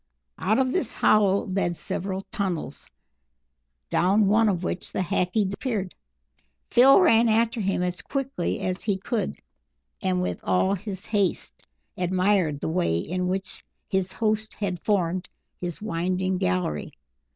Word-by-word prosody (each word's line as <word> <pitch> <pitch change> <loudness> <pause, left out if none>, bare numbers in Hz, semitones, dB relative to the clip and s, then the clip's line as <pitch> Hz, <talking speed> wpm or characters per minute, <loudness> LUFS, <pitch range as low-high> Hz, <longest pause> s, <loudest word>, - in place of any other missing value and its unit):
Out 210 +4 +2
of 260 -1 +2
this 280 -6 -1
hollow 200 -2 +3
led 185 -3 -1
several 190 +1 -4
tunnels, 190 -6 -3 1.0
down 200 +4 +3
one 215 +2 +4
of 185 -3 -1
which 180 - -4
the - - -1
Hackee 180 +4 +1
disappeared. 200 -1 -3 0.8
Phil 265 +6 +7
ran 235 -10 +5
after 230 +1 +2
him 195 -2 0
as 180 0 -2
quickly 270 -9 -2
as 185 0 -2
he 205 -3 0
could, 215 +3 -2 0.6
and 185 -2 +1
with 180 - -3
all 190 +1 +2
his 200 0 -5
haste, 200 -3 -1 0.3
admired 180 -4 +1
the - - -2
way 165 - +1
in 180 - -2
which 190 +1 -3 0.3
his 190 -1 0
host 215 0 -1
had 185 -4 -3
formed 185 -3 0 0.3
his 175 +2 -5
winding 185 -1 -1
gallery. 90 -5 -1
190 Hz, 140 wpm, -25 LUFS, 180-215 Hz, 1.0 s, Phil